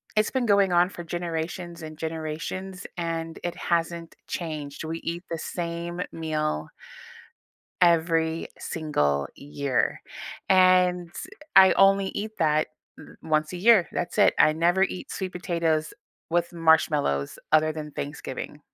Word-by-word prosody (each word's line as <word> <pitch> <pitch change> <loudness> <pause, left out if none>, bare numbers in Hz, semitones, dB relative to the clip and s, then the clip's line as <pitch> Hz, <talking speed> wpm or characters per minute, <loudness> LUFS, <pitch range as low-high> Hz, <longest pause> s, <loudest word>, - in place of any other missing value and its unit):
it's 215 0 +3
been 260 -2 0
going 200 -3 +4
on 175 +1 +4
for 175 - -8
generations 170 0 -4
and 155 0 -8
generations, 165 +4 -5
and 165 -1 -3
it 175 - -3
hasn't 170 0 -2
changed. 150 -4 -5
We 165 +1 -4
eat 170 +2 -4
the 165 - -1
same 170 +1 -4
meal 155 - -2 1.1
every 165 -1 +3
single 75 - 0
year, 140 -2 -1 0.5
and, 185 -1 +4 0.5
eh 190 - +9
I - - +4
only 195 0 +5
eat 215 +3 -4
that 155 -1 +2 0.3
th - - -13
once 155 +1 0
a - - -4
year, 215 -7 +7
that's 175 - -3
it. 205 - +5
I - - +6
never 175 +4 +3
eat 185 - -4
sweet 190 -1 -4
potatoes 165 -3 -1 0.4
with 170 +1 0
marshmallows 150 - +2
other 155 0 +5
than 155 -1 -7
Thanksgiving. 145 0 -6
165 Hz, 135 wpm, -26 LUFS, 155-180 Hz, 1.1 s, eh